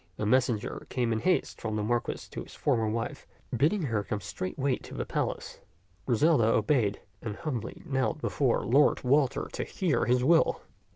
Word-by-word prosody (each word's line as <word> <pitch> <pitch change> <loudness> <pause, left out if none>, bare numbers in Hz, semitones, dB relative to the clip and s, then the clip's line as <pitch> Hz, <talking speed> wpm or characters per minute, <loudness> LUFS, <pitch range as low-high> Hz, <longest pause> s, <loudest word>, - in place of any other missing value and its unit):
A 105 - -2
messenger 120 -2 +1
came 120 -3 0
in 110 - 0
haste 180 +10 0
from 110 -1 -2
the 105 - -1
Marquis 120 +2 -1
to - - -5
his - - -11
former 115 -6 +1
wife, 115 +1 -3 0.3
bidding 160 - +2
her 115 -7 0
come 105 - -3
straightway 130 +8 -2
to - - -11
the - - -3
palace. - - -3 0.5
Griselda 125 +1 +4
obeyed, 110 -3 +2 0.2
and 110 -3 -4
humbly 145 -8 -5
knelt 135 +2 0
before 135 -5 +1
Lord 140 +5 +4
Walter 135 +1 +2
to - - -2
hear 165 -10 0
his 125 0 +2
will. 165 +4 +4
125 Hz, 170 wpm, -29 LUFS, 110-145 Hz, 0.5 s, Griselda